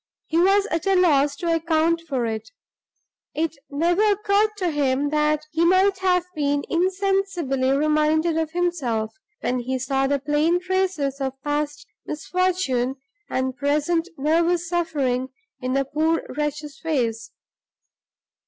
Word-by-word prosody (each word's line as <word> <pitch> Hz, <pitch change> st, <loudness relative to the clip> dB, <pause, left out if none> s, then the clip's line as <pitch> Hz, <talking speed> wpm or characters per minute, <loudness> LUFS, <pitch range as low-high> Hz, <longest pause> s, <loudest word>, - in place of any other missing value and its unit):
He 325 Hz, -, 0 dB
was 390 Hz, +3 st, +4 dB
at 330 Hz, +3 st, -1 dB
a 390 Hz, -, +4 dB
loss 295 Hz, -6 st, +3 dB
to 335 Hz, +2 st, -1 dB
account 330 Hz, 0 st, +1 dB
for 255 Hz, -4 st, 0 dB
it. 220 Hz, -1 st, -4 dB, 0.9 s
It 320 Hz, +1 st, -1 dB
never 340 Hz, +7 st, +1 dB
occurred 420 Hz, 0 st, +3 dB
to 360 Hz, -4 st, 0 dB
him 285 Hz, -1 st, 0 dB
that 300 Hz, 0 st, +1 dB
he 325 Hz, +1 st, +1 dB
might 375 Hz, +2 st, +4 dB
have 360 Hz, -2 st, +2 dB
been 285 Hz, -2 st, 0 dB
insensibly 365 Hz, -7 st, 0 dB
reminded 305 Hz, +3 st, +2 dB
of 320 Hz, -1 st, 0 dB
himself, 310 Hz, -11 st, -1 dB, 0.3 s
when 250 Hz, 0 st, 0 dB
he 260 Hz, +2 st, -2 dB
saw 270 Hz, +1 st, 0 dB
the 285 Hz, +1 st, +1 dB
plain 300 Hz, +5 st, +1 dB
traces 360 Hz, -7 st, -1 dB
of 270 Hz, 0 st, -3 dB
past 295 Hz, 0 st, -2 dB, 0.2 s
misfortune 305 Hz, -6 st, 0 dB, 0.3 s
and 260 Hz, 0 st, -1 dB
present 300 Hz, +5 st, 0 dB
nervous 335 Hz, +4 st, +1 dB
suffering 285 Hz, -7 st, -1 dB, 0.3 s
in 255 Hz, -1 st, -2 dB
the 275 Hz, 0 st, +1 dB
poor 315 Hz, +4 st, 0 dB
wretch's 300 Hz, 0 st, -3 dB
face. 230 Hz, -8 st, -1 dB
305 Hz, 135 wpm, -23 LUFS, 275-350 Hz, 0.9 s, was